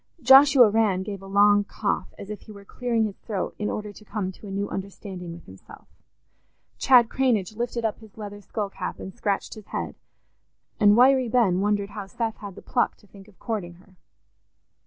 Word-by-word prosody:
Joshua 270 -1 +8
Rann 205 -4 +2
gave 200 -1 -6
a 195 - -11
long 205 +1 +5
cough, 200 -2 -3
as 200 - -8
if 210 - -7
he 220 - -13
were 200 -1 -12
clearing 235 0 -1
his 210 -3 -4
throat 200 -5 -4
in 210 - -1
order 210 -1 -5
to 210 - -15
come 200 -2 -4
to 205 - -13
a - - -7
new 200 +1 -2
understanding 190 -3 -7
with 170 0 -11
himself; 95 0 -15 0.9
Chad 245 -3 +6
Cranage 220 -7 0
lifted 235 0 -3
up 220 - -2
his 220 -2 -17
leather 205 -1 -8
skull 205 0 -4
cap 185 - -5
and 190 - -8
scratched 205 -4 -2
his 215 -3 -12
head; - - -4 0.9
and 210 0 +6
Wiry 260 0 +5
Ben 215 -7 +3
wondered 205 0 0
how 205 -2 -7
Seth 225 +2 -3
had 200 -3 -9
the - - -12
pluck 245 - 0
to - - -23
think 195 -1 -16
of 205 - -21
courting 200 -7 -4
her. 185 +2 -22
205 Hz, 200 wpm, -25 LUFS, 195-225 Hz, 0.9 s, Joshua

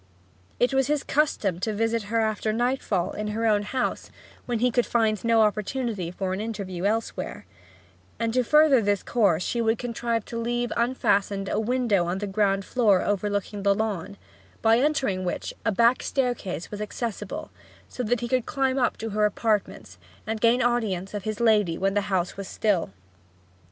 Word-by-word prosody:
It 245 +2 +2
was 265 -1 +2
his 295 -1 0
custom 220 - 0
to 215 +4 -1
visit 225 +1 0
her 230 0 +2
after 215 0 0
nightfall, 230 -6 0
in 210 0 -4
her 220 +2 -2
own 210 -2 +3
house, 250 +4 -2 0.4
when 240 -2 0
he 245 +2 +2
could 245 0 +1
find 220 -3 +1
no 230 -1 +4
opportunity 210 -2 -1
for 185 +1 -3
an 190 - -3
interview 200 -5 -4
elsewhere; 220 +2 -2 0.7
and 230 -1 -1
to 255 0 +2
further 300 -2 +5
this 205 -2 0
course 200 -8 +2
she 235 - -1
would 225 0 +2
contrive 235 -2 -2
to 230 - -5
leave 240 +1 -1
unfastened 205 -5 +1
a - - 0
window 220 -6 +1
on 175 +2 -1
the 205 - -3
ground 195 -1 +1
floor 210 -7 +3
overlooking 205 0 -1
the 200 0 +3
lawn, 200 -2 -3 0.5
by 225 +1 +5
entering 265 -10 +1
which 180 - -3
a - - +1
back 235 +4 +3
stair 255 -3 0
case 180 -8 -6
was 210 0 -5
accessible; 220 +1 -5 0.4
so - - -6
that 245 +1 0
he 240 - -2
could 255 -1 0
climb 270 -2 0
up 245 - +1
to 225 - -4
her 210 +1 +2
apartments, 205 - -2 0.3
and 220 0 -3
gain 240 +2 +4
audience 215 -6 0
of 205 -2 -5
his 215 -1 -3
lady 210 -7 +3
when 195 +1 0
the 205 - +2
house 185 -2 0
was 195 -1 -6
still. 205 -6 0
220 Hz, 180 wpm, -25 LUFS, 200-240 Hz, 0.7 s, further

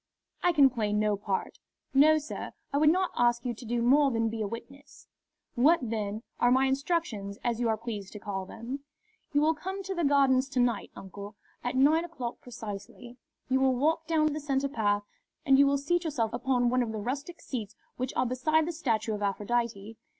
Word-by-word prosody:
"I 355 - +4
can 280 -5 +5
play 215 -4 -1
no 210 0 +2
part." 200 -1 -3 0.3
"No, 305 +3 +6
sir. 305 0 -6 0.2
I 285 - +2
would 300 0 +6
not 370 +3 +2
ask 240 0 +2
you 245 - -1
to 235 +2 -11
do 235 +1 -1
more 280 +4 +5
than 225 -2 0
be 220 0 -4
a 210 - -1
witness." 260 +6 -10 0.5
"What, 295 +8 +5
then, 215 -1 -3 0.2
are 245 - +4
my 260 +2 +4
instructions, 265 - -1
as 240 -2 0
you 240 -2 +1
are 220 - +1
pleased 215 -4 -6
to 210 - -7
call 195 -2 -4
them?" 235 +7 -6 0.5
"You 290 - +3
will 315 +1 +4
come 380 +5 -5
to 385 +1 -3
the 345 -2 -1
Gardens 275 -2 +3
to 265 - -1
night, 245 -1 +1
uncle, 200 +2 -9 0.3
at 245 +1 -2
nine 300 +5 +4
o'clock 260 -9 -6
precisely. 235 +1 -8 0.3
You 265 +1 +2
will 265 -1 +3
walk 315 +5 +1
down 310 -2 +2
the 305 - -3
centre 280 -2 0
path, 205 -6 0 0.4
and 270 0 +5
you 280 - +7
will 280 0 +2
seat 340 +5 0
yourself 240 -9 -1
upon 245 0 +1
one 255 0 +2
of 235 -2 -2
the 220 - -4
rustic 280 +10 -4
seats 220 -9 -6 0.2
which 255 +1 -2
are - - +2
beside 305 +6 +1
the 345 - -2
statue 230 -9 -1
of 210 - -4
Aphrodite. 215 +1 -2
250 Hz, 205 wpm, -29 LUFS, 225-290 Hz, 0.5 s, you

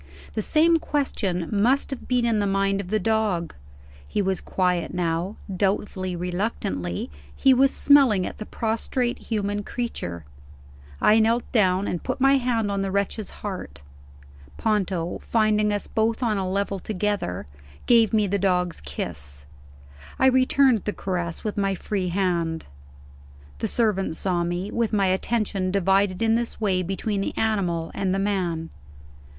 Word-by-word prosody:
The 215 - -1
same 325 +8 +4
question 200 - -1
must 240 +8 +2
have 270 - -6
been 250 -2 +2
in 225 -2 +2
the 205 - +1
mind 195 0 +1
of 190 - -9
the 215 +3 0
dog. 210 -5 0 0.5
He - - -2
was 190 -2 0
quiet 180 -2 0
now. 175 +3 -1 0.2
Doubtfully, 190 -1 -1
reluctantly, 175 - -3 0.2
he 265 - +5
was 265 +1 +4
smelling 265 -10 +5
at - - -7
the 215 - -6
prostrate 240 +2 -1
human 205 -2 -2
creature. 85 - -4 0.7
I 215 +1 +5
knelt 230 +2 +3
down, 190 -3 +2
and 175 - -2
put - - -3
my 270 +1 +5
hand 235 -5 0
on 200 -1 -1
the 195 - -1
wretch's 200 +2 -1 0.2
heart. 70 - -6 0.7
Ponto, 190 -5 -1
finding 215 -2 +2
us 205 -1 -1
both 225 +2 0
on 225 -3 +1
a 190 -1 -2
level 200 0 -1
together, 205 - -2 0.4
gave 230 -3 +5
me 215 -2 +3
the 200 +1 0
dog's 180 - 0
kiss; 70 0 -6 0.7
I - - +3
returned 260 -3 +4
the 210 - -1
caress 175 -3 -3
with 210 -1 -3
my 195 -1 +1
free 190 -1 -2
hand. 170 -3 -1 0.9
The - - -1
servant 205 -7 +1
saw 175 -1 0
me, 175 +4 -3
with 230 -1 -1
my 200 -2 +3
attention 195 0 0
divided 195 +1 +2
in 225 0 +3
this 235 0 -1
way 195 -4 +1
between 195 +3 -2
the - - -4
animal 180 -7 0
and 190 -1 0
the - - 0
man. 180 -5 -1
200 Hz, 155 wpm, -24 LUFS, 180-220 Hz, 0.9 s, he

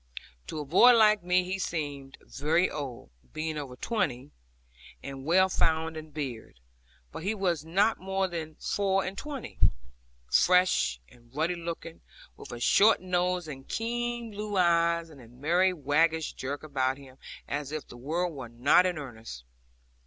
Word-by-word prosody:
To - - -5
a 150 - -4
boy 235 - +7
like 215 -2 +5
me 180 +1 +3
he 185 +2 -3
seemed 145 -6 -4
very 160 +6 +1
old, 135 - -6 0.2
being 155 0 -3
over 140 -4 -6
twenty, 135 - -2 0.7
and 135 -1 -7
well 185 +4 +5
found 160 -3 0
in 155 0 -8
beard; 130 - -6 0.5
but - - -7
he 200 +6 -1
was 175 -7 0
not 195 +7 +2
more 190 +1 -1
than 160 -3 -6
four 195 +1 0
and 190 - -4
twenty, 280 +1 -7 0.7
fresh 180 - +3
and 120 - -21
ruddy 160 +4 +1
looking, 170 -1 -7 0.3
with - - -11
a 120 - -6
short 205 - +5
nose 180 -1 0
and 135 -3 -9
keen 240 0 -2
blue 205 -1 -4
eyes, 170 -2 +2
and 140 -4 -14
a 115 - -14
merry 165 +10 +2
waggish 160 0 +1
jerk 140 +3 -5
about 135 -3 -1
him, 135 -2 -15 0.3
as 145 -1 -3
if 155 -1 -5
the - - -12
world 165 +8 -2
were 130 -5 -7
not 140 +10 +4
in 180 -2 -2
earnest. 115 - -8
160 Hz, 160 wpm, -28 LUFS, 140-185 Hz, 0.7 s, boy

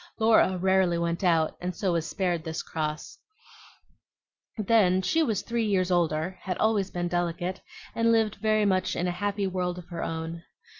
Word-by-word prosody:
Laura 220 -4 +4
rarely 190 -1 +2
went 170 +2 -2
out, 165 -3 +2
and 180 0 -3
so 190 +1 0
was 165 -1 -1
spared 175 -4 -1
this 160 -1 -4
cross; 155 +9 -4 1.4
then 205 -4 +3
she 325 - +2
was 220 - 0
three 230 +1 -1
years 185 -3 +1
older, 175 0 0
had 185 -2 -3
always 215 -3 +1
been 175 -1 -3
delicate, 175 +1 -2 0.3
and 230 0 +2
lived 220 -2 +1
much 205 -4 +2
in 175 - -1
a 180 - 0
happy 200 +2 -2
world 180 -1 -2
of 180 - -9
her 170 - -5
own. 165 +1 -4
185 Hz, 165 wpm, -27 LUFS, 170-205 Hz, 1.4 s, Laura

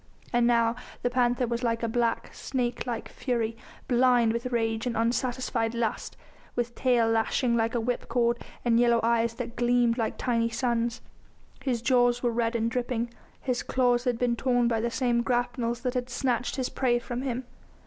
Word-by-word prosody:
And 240 0 +4
now 235 -1 +3 0.3
the 245 - +1
panther 245 0 +2
was 235 0 -2
like 230 -1 0
a - - +1
black, 230 0 -1
snake 245 -2 -3
like 235 -2 -3
fury, 230 -3 -2 0.3
blind 245 -2 +4
with 235 +2 -2
rage 225 -1 -1
and 235 - -2
unsatisfied 235 0 0
lust, 230 -2 -2 0.4
with 240 0 -1
tail 245 -3 +2
lashing 225 +2 +1
like 230 +1 +1
a - - +3
whipcord 235 0 0 0.3
and 235 -1 +4
yellow 235 -1 +4
eyes 230 0 +2
that 235 -1 -5
gleamed 240 0 +2
like 225 - -1
tiny 230 -2 +1
suns. 235 -1 -1 0.6
His 245 -4 -1
jaws 245 -1 +3
were 240 - +2
red 230 0 0
and 230 0 0
dripping, 240 -1 -2 0.3
his 250 -1 -1
claws 245 -1 +1
had 245 -2 +1
been 240 0 +1
torn 245 -1 +2
by 225 -2 +1
the 235 - 0
same 240 -1 +1
grapnels 240 -1 -1
that 250 - -1
had 250 -1 -2
snatched 245 -1 -1
his 260 -3 -1
prey 245 -2 +1
from 240 +1 -4
him. 260 -1 -2
240 Hz, 180 wpm, -27 LUFS, 230-245 Hz, 0.6 s, And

